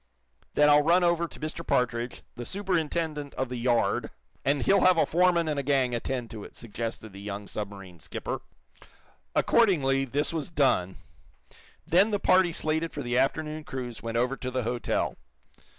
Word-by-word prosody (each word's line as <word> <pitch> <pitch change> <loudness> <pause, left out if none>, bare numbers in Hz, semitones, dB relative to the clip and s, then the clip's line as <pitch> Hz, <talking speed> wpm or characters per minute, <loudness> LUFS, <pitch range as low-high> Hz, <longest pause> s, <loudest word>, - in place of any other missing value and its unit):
"Then 150 - +5
I'll 150 0 +7
run 170 +4 +4
over 170 -1 +2
to - - -13
Mr. 155 +2 -4
Partridge, 120 -4 -1
the 120 - -6
superintendent 165 - -2
of 130 -1 -2
the 125 - -4
yard, 120 -1 +1 0.3
and 140 -1 +1
he'll 200 0 +4
have 185 -2 +6
a - - +4
foreman 175 -1 +3
and 150 -2 0
a - - +1
gang 135 -3 +1
attend 120 0 -3
to 110 -3 -7
it," - - -12
suggested 115 -2 -6
the 100 - -9
young 100 0 -6
submarine 100 -4 -7
skipper. - - -5 0.9
Accordingly, 135 -12 +3
this 145 +5 0
was 160 -1 -3
done. 130 - +2 0.9
Then 190 +6 +4
the 205 -2 0
party 185 -2 +4
slated 160 +1 -1
for 145 - -4
the 120 0 -2
afternoon 155 +3 -1
cruise 125 -5 -6
went 115 0 -3
over 125 +3 +1
to 130 - -4
the 130 0 -2
hotel. 120 +1 -1
135 Hz, 170 wpm, -28 LUFS, 120-165 Hz, 0.9 s, I'll